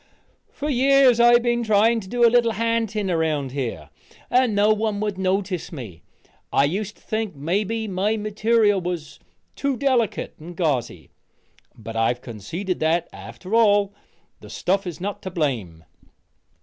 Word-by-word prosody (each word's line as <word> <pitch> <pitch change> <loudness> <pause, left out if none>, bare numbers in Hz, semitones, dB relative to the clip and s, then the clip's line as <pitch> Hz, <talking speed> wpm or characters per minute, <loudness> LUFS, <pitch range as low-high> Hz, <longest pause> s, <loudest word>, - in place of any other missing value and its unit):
"For 290 - -5
years 270 -2 +4
I've 240 0 +6
been 240 0 +1
trying 225 +1 +3
to 190 - -10
do 240 +4 +2
a 230 - +5
little 235 -1 +3
ha'nting 220 -3 -1
around 155 -5 0
here, 115 - -5 0.4
and 250 -4 +3
no 210 +1 +4
one 215 -1 -1
would 205 -2 -3
notice 190 -1 -1
me. 110 - -9 0.5
I - - +3
used 200 +7 -3
to - - -26
think 220 -4 -3
mebbe 205 +9 -2
my 200 +3 0
material 215 -1 +2
was 175 -3 -5 0.4
too 275 -2 -1
delicate 255 -5 0
and 170 +2 -10
gauzy, 125 - -2 0.7
but 115 0 -8
I've 115 +2 +1
conceded 160 - -5
that, 165 +2 +1
after 115 - -9
all, 205 -3 +4 0.5
the - - -13
stuff 195 +1 -1
is 175 - -6
not 200 +3 -4
to 190 - -5
blame." 120 - -3
200 Hz, 150 wpm, -23 LUFS, 155-225 Hz, 0.7 s, I've